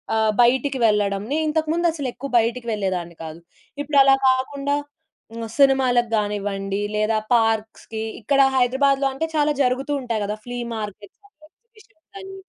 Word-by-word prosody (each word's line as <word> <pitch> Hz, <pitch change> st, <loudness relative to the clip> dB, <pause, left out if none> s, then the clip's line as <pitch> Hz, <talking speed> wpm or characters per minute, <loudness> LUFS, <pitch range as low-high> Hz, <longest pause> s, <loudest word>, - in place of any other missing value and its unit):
ఆహ్, 220 Hz, -1 st, +2 dB
బయటికి 265 Hz, +3 st, +1 dB
వెళ్ళడం. 205 Hz, -2 st, 0 dB
నేనింతకు 315 Hz, 0 st, 0 dB
ముందసలు 330 Hz, -6 st, 0 dB
ఎక్కువ 275 Hz, +2 st, -7 dB
బయటకి 235 Hz, +1 st, -2 dB
వెళ్ళేదాన్ని 185 Hz, -5 st, -3 dB
కాదు. 160 Hz, +1 st, -9 dB, 0.4 s
ఇప్పుడలా 275 Hz, -2 st, +5 dB
కాకుండా 275 Hz, +2 st, -1 dB, 0.8 s
సినిమాలకు 260 Hz, -4 st, +3 dB
గానివ్వండి, 200 Hz, -1 st, -2 dB
లేదా 215 Hz, +1 st, +1 dB, 0.2 s
పార్క్స్‌కి 220 Hz, 0 st, -1 dB, 0.2 s
ఇక్కడ 275 Hz, +6 st, +1 dB, 0.2 s
హైదరాబాద్‌లో 270 Hz, +2 st, +2 dB
అంటే 320 Hz, +5 st, -2 dB
చాలా 300 Hz, 0 st, +2 dB
జరుగుతూ 260 Hz, +3 st, -1 dB
ఉంటాయి 230 Hz, -4 st, -2 dB
గదా! 210 Hz, +1 st, -3 dB
ఫ్లీ 245 Hz, 0 st, -6 dB, 0.2 s
మార్కెట్స్ 210 Hz, -2 st, -8 dB
అనీ 310 Hz, -7 st, -23 dB
ఎగ్జిబిషన్స్ 430 Hz, -5 st, -26 dB
అనీ. 385 Hz, 0 st, -10 dB
250 Hz, 130 wpm, -22 LUFS, 210-285 Hz, 0.8 s, ఇప్పుడలా